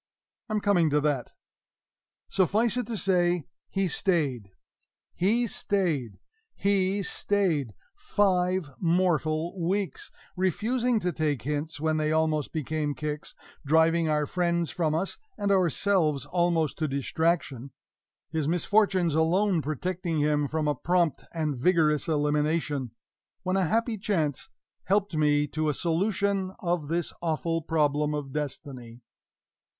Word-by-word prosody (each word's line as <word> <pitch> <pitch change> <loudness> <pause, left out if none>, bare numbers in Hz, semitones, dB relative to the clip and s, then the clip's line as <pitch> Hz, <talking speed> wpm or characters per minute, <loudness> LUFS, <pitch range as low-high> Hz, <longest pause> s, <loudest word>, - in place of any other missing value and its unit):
I'm 215 -1 0
coming 180 -6 +3
to 150 0 +2
that. 145 -5 -1 0.9
Suffice 205 +5 +2
it 250 - -2
to 230 -2 -3
say, 175 -5 +1 0.2
he 195 -1 0
stayed 140 - -1 0.6
he 225 +7 +2
stayed 160 - -1 0.4
he 200 0 +1
STAYED! 165 - 0 0.2
five 185 - +1
mortal 170 -1 +1
weeks; 195 +3 -2 0.3
refusing 230 +6 +1
to 180 0 0
take 150 -6 -1
hints 150 +2 -3
when 155 0 +1
they 155 0 0
almost 155 -2 +1
became 155 -1 -2
kicks; 150 0 -5 0.3
driving 160 +2 +3
our 150 -1 +1
friends 170 +1 0
from 155 -3 0
us, 185 +4 -2 0.2
and 200 -1 0
ourselves 175 -4 +2
almost 170 -4 0
to 155 - +1
distraction; 140 -1 -1 0.6
his 155 -3 -1
misfortunes 180 0 +2
alone 170 +3 +2
protecting 165 +3 -2
him 150 -1 +2
from 155 +1 -1
a 150 - +2
prompt 170 +3 0
and 155 -3 -1
vigorous 155 -1 +2
elimination; 150 -2 0 0.5
when 185 0 0
a 190 -1 +2
happy 225 +2 0
chance 160 -9 -1 0.4
helped 200 -2 +1
me 150 -1 +3
to 155 +1 -1
a 150 - -1
solution 190 +3 0
of 175 -7 -1
this 170 +2 -2
awful 165 0 -1
problem 150 -1 +1
of 140 -2 -5
destiny. 130 -5 -6
165 Hz, 125 wpm, -27 LUFS, 150-185 Hz, 0.9 s, coming